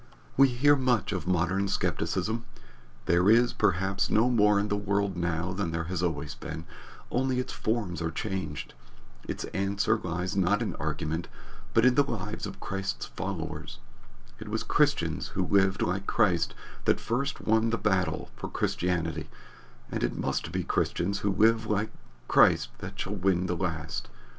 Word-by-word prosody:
We 135 +1 +7
hear 135 +4 +4
much 125 -8 +1
of 90 -2 -3
modern 90 +2 +1
skepticism. 110 +3 -1 0.6
There 90 +3 +4
is, 120 +2 +5
perhaps, 95 +1 +1
no 115 +4 +3
more 105 -3 +4
in 100 - 0
the 105 - +1
world 100 -1 0
now 85 +1 -1
than 95 -2 -1
there 80 0 -2
has 85 +1 -3
always 80 -4 -2
been, 80 0 -7 0.5
only 130 0 +1
its 125 - -3
forms 105 -6 -1
are 80 - 0
changed. 95 -5 -4 0.5
Its - - -3
answer 100 +3 +1
lies 90 +1 -3
not 100 +2 +2
in - - -3
argument, 80 +3 -2 0.5
but 115 - +5
in 125 - +6
the 140 - +5
lives 105 -4 -4
of 100 - -9
Christ's 95 0 -3
followers. - - -5 0.6
It - - -8
was - - -1
Christians - - +1
who - - +2
lived 95 -1 +3
like 95 +3 -1
Christ 90 -5 +2 0.3
that - - +5 0.5
won 110 +1 +3
the 115 - 0
first - - -15
battle 95 -3 0
for - - -6
Christianity, 85 -2 -1 0.6
and - - -2
it - - -1
must - - -2
be - - -1
Christians 95 +3 0
who 100 - 0
live 110 +2 +3
like 105 0 0 0.4
Christ - - +5
that - - -8
shall 95 - -2
win 95 -2 +1
the 90 -1 -1
last. 85 -3 -3
95 Hz, 160 wpm, -28 LUFS, 90-110 Hz, 0.6 s, We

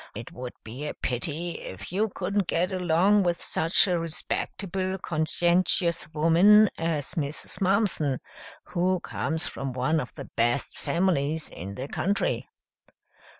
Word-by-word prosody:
"It 115 +2 -7
would 125 0 -7
be 125 +7 -6
a - - -5
pity 155 +7 -3
if 95 - -8
you 210 +4 +1
couldn't 195 0 -1
get 180 +3 +1
along 185 +3 +3
with 175 -2 0
such 165 +5 +4
a 180 -2 +1
respectable, 185 +3 -2
conscientious 170 +1 +1
woman 180 +7 +6
as 160 -4 -2
Mrs. 150 +3 -2
Mumpson, 185 - +2 0.5
who 180 +1 +1
comes 160 +2 -2
from 135 -2 -4
one 130 +6 +1
of 125 - -5
the - - -7
best 120 +4 0
families 160 -4 0
in 100 +4 -8
the 130 +5 -5
country." 200 +7 -1
170 Hz, 135 wpm, -27 LUFS, 145-185 Hz, 0.5 s, woman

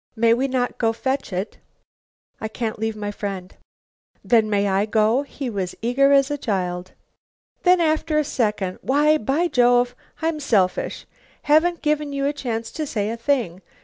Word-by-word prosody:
"May 230 0 +4
we 260 +3 +1
not 255 -2 -2
go 225 -1 +2
fetch 265 +1 -2
it?" 185 +3 -4 0.8
"I 220 - -3
can't 220 0 -4
leave 220 0 -2
my 205 -1 -4
friend." 195 -3 -6 0.7
"Then 225 -3 +3
may 205 -1 +1
I 195 +2 +1
go?" 220 +4 +2
He 280 -1 -6
was 195 -6 -3
eager 265 +5 +3
as 275 0 +4
a 290 - -2
child. 180 -5 -3 0.7
Then 360 0 +4
after 315 -1 +1
a 305 - +3
second, 210 -9 -1
"Why, 300 +3 +3
by 285 +10 +1
Jove! 245 -3 +3 0.3
I'm 320 -1 -1
selfish. 200 -10 0 0.4
Haven't 325 +4 +3
given 300 -1 0
you 275 0 -1
a 285 - +1
chance 230 -5 -4
to 310 -1 -4
say 210 -4 -2
a - - -3
thing. 230 - -1
245 Hz, 170 wpm, -22 LUFS, 210-285 Hz, 0.8 s, May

